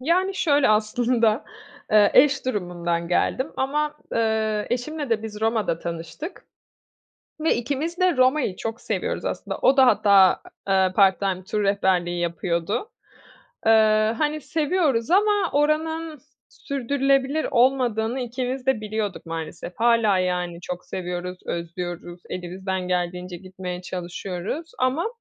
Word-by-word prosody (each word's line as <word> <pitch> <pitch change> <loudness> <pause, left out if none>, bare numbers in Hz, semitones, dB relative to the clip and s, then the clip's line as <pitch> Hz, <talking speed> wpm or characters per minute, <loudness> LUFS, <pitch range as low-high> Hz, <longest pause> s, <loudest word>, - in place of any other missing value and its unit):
Yani 365 +7 +1
şöyle, 290 -6 +3
aslında, 225 +1 +2 0.5
eee, 205 -1 +6
eş 280 0 +5
durumundan 175 -7 -2
geldim 260 - 0
ama, 295 +3 -1 0.2
ııı, 220 -2 0
eşimle 280 +2 -3
de 220 -1 +1
biz 215 -1 -7
Roma'da 220 -6 0
tanıştık 170 - -7 1.0
ve 320 - +2
ikimiz 290 +8 -3
de 365 -4 +3
Roma'yı 255 -5 +2
çok 225 +3 -5
seviyoruz - - -3
aslında. - - -4
O 270 - +4
da 265 -1 +7
hatta, 200 -6 +5 0.3
ııı, 190 -1 +3
part 195 -2 +5
time 190 -2 -2
tur 210 +2 -2
rehberliği 185 -3 +1
yapıyordu. 170 - -2 0.8
Iıı, 215 -1 +5
hani 300 +5 -1
seviyoruz 300 -4 0
ama 405 -1 +3
oranın 310 +2 0 0.3
sürdürülebilir 275 +2 0
olmadığını 245 -1 +2
ikimiz 250 +1 -4
de 265 -5 +2
biliyorduk 210 -4 -4
maalesef. 165 +1 -6
Hâlâ, 230 -4 +3
yani, 180 -1 -1
çok 180 0 -6
seviyoruz, 180 0 -5
özlüyoruz, 175 +1 -5
elimizden 185 +1 -4
geldiğince 180 0 -2
gitmeye 185 -1 -7
çalışıyoruz 180 - -5
ama 260 +8 +1
220 Hz, 120 wpm, -24 LUFS, 185-275 Hz, 1.0 s, da